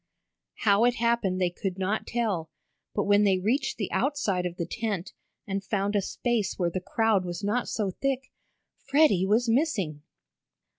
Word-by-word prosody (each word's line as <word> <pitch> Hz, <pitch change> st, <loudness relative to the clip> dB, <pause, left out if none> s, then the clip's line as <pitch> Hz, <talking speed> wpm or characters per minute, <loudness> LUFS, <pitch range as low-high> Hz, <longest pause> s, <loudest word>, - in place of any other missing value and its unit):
How 205 Hz, 0 st, +4 dB
it 245 Hz, 0 st, +3 dB
happened 230 Hz, -6 st, +1 dB
they 180 Hz, -1 st, +1 dB
could 185 Hz, +1 st, -4 dB
not 195 Hz, +3 st, -1 dB
tell, 205 Hz, -9 st, -1 dB, 0.5 s
but 205 Hz, -, +1 dB
when 205 Hz, 0 st, +4 dB
they 195 Hz, -2 st, +4 dB
reached 250 Hz, +9 st, 0 dB
the 205 Hz, -, -3 dB
outside 195 Hz, -, 0 dB
of 175 Hz, 0 st, -8 dB
the 170 Hz, -, -2 dB
tent, 205 Hz, -5 st, -3 dB, 0.3 s
and 195 Hz, 0 st, -3 dB
found 200 Hz, 0 st, -1 dB
a 205 Hz, -, +3 dB
space 230 Hz, +1 st, -1 dB
where 175 Hz, -2 st, 0 dB
the 185 Hz, -, -3 dB
crowd 210 Hz, 0 st, +1 dB
was 175 Hz, +2 st, -5 dB
not 220 Hz, +5 st, 0 dB
so 205 Hz, -4 st, -1 dB
thick, 270 Hz, +5 st, -2 dB, 0.5 s
Freddie 275 Hz, -, +4 dB
was 225 Hz, +4 st, +2 dB
missing. 225 Hz, -, 0 dB
205 Hz, 165 wpm, -27 LUFS, 185-235 Hz, 0.5 s, How